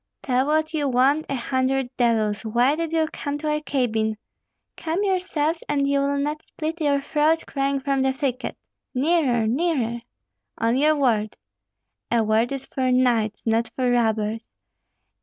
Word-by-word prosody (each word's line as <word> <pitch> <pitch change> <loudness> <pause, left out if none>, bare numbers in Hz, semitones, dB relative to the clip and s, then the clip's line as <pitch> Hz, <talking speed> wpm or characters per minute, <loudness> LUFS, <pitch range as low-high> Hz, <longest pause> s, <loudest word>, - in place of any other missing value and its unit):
"Tell 260 0 +1
what 310 +1 +1
you 295 -3 0
want, 270 +5 +2
a 275 - -1
hundred 260 0 -1
devils! 220 -4 +1
Why 240 +6 +2
did 330 0 -3
you 325 -1 +2
come 285 -1 -3
to 305 0 -2
our 300 0 -1
cabin?" 220 -7 -1 0.6
"Come 330 +5 -2
yourselves, 350 -5 0
and 280 -1 +1
you 280 0 +2
will 280 0 0
not 295 +2 -2
split 320 +2 -5
your 285 -2 +2
throat 310 +3 +1
crying 275 0 -1
from 275 0 0
the 265 0 +2
thicket. 265 -2 -3 0.4
Nearer, 265 -5 +2
nearer!" 240 -2 0 0.6
"On 230 +1 +1
your 305 +3 +3
word." 225 -7 +1 0.7
"A 235 -1 +2
word 220 +3 +1
is 275 -1 -4
for 260 -2 -1
knights, 235 -4 +1
not 225 0 +1
for 250 -2 +1
robbers. 220 -2 +1
270 Hz, 160 wpm, -23 LUFS, 235-300 Hz, 0.7 s, your